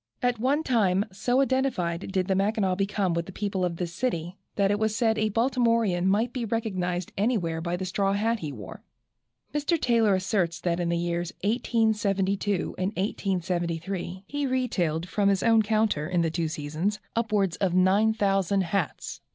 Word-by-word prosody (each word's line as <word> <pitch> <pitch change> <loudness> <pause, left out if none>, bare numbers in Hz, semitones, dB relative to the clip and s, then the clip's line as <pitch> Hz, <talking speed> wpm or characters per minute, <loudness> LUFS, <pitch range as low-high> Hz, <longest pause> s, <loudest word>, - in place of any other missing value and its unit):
At 245 -2 +1
one 280 +6 +1
time 205 -7 +2
so 245 +7 +1
identified 235 -11 0
did 190 -1 +1
the 195 - +2
Mackinaw 195 0 +1
become 195 -1 0
with 170 0 -2
the - - -7
people 195 -1 -2
of 175 -2 0
this 170 0 -4
city, 175 -5 -2 0.2
that 200 -1 +2
it 205 - 0
was 220 -1 0
said 220 -1 +2
a 215 0 +2
Baltimorean 230 -5 +2
might 220 +5 +2
be 250 - -2
recognized 185 -6 -2
anywhere 185 -8 0
by 170 +1 -2
the 185 - -4
straw 195 +2 0
hat 225 +3 0
he 155 -5 -4
wore. 105 -8 -9 0.7
Mr. 300 +3 +1
Taylor 230 -6 +3
asserts 185 -3 0
that 175 -1 0
in 175 -1 0
the 170 - +1
years 170 0 -2
1872 205 -4 +1
and 185 - +1
1873 180 -2 -2
he 290 +4 -2
retailed 180 -11 0
from 200 +1 +1
his 195 -1 +1
own 225 -1 +5
counter, 215 -8 +1
in 180 -2 +1
the 165 - 0
two 165 0 -1
seasons, 155 +7 -2 0.2
upwards 210 -6 +1
of 185 -3 0
9000 195 0 +3
hats. 185 -2 -3
195 Hz, 170 wpm, -27 LUFS, 175-220 Hz, 0.7 s, own